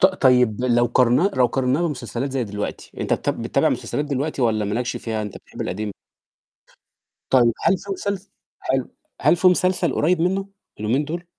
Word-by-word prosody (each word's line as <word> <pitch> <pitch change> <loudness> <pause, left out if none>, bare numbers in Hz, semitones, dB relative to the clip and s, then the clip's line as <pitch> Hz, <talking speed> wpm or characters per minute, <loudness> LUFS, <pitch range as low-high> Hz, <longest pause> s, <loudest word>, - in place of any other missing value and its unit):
ط 190 - +8
طيب 125 - +3
لو 120 -1 +3
قارنّاه 125 - +3
لو 125 -1 +5
قارنّاه 130 +4 0
بمسلسلات 135 -3 -3
زي 130 -3 0
دلوقتي 105 -1 -5
أنت - - -1
بتاب - - -1
بتتابع - - +2
مسلسلات 145 - -2
دلوقتي 140 -1 -2
والّا 110 -3 +2
مالكش 115 +5 -2
فيها 110 -2 -3
أنت 105 -2 -6
بتحب - - -12
القديم؟ 105 -1 -3 1.4
طيب 120 -3 +5
هل 190 - +3
في 200 - -9
مسلس 200 0 -4 0.3
حلو، - - -1 0.3
هل - - +4
في 185 - +2
مسلسل 180 -1 +2
قريّب 165 +2 +2
منّه 195 +3 0 0.3
اليومين 120 +8 +1
دُول؟ 170 +4 -5
130 Hz, 170 wpm, -22 LUFS, 120-175 Hz, 1.4 s, ط